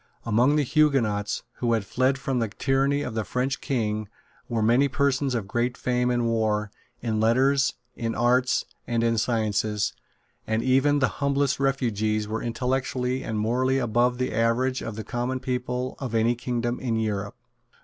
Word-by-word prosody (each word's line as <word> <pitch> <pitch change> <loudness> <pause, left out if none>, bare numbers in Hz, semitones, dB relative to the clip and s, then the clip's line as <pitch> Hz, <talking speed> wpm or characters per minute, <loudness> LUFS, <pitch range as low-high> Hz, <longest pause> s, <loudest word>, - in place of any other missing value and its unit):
Among 120 +6 +3
the 150 - +3
Huguenots 120 -8 +1
who 120 -1 +1
had 110 -3 0
fled 130 +7 +1
from 130 -1 -1
the 115 - 0
tyranny 135 +5 +1
of 125 - -4
the 110 -1 -1
French 130 +4 -2
King 110 -6 -1 0.4
were 115 -2 0
many 120 +6 +4
persons 140 -1 +1
of 110 -5 -2
great 120 +4 -1
fame 125 0 0
in 120 -1 +1
war, 110 -2 0 0.3
in 110 -2 -1
letters, 130 +5 +3 0.2
in 115 -1 -3
arts 125 +2 +2 0.2
and 115 -1 0
in 115 -1 +2
sciences; 105 -2 0 0.5
and 110 +1 0
even 135 +3 +3
the 135 - +3
humblest 140 -1 +1
refugees 110 -6 0
were 110 +1 -3
intellectually 125 +1 -1
and 110 - -3
morally 125 +5 +1
above 120 0 +1
the 125 -2 -2
average 115 +4 +1
of 115 - -5
the 110 - -5
common 125 +3 -2
people 125 0 -2
of 125 -4 -4
any 115 +2 +3
kingdom 120 0 -2
in 120 -3 -1
Europe. 105 -2 -2
120 Hz, 165 wpm, -25 LUFS, 110-130 Hz, 0.5 s, many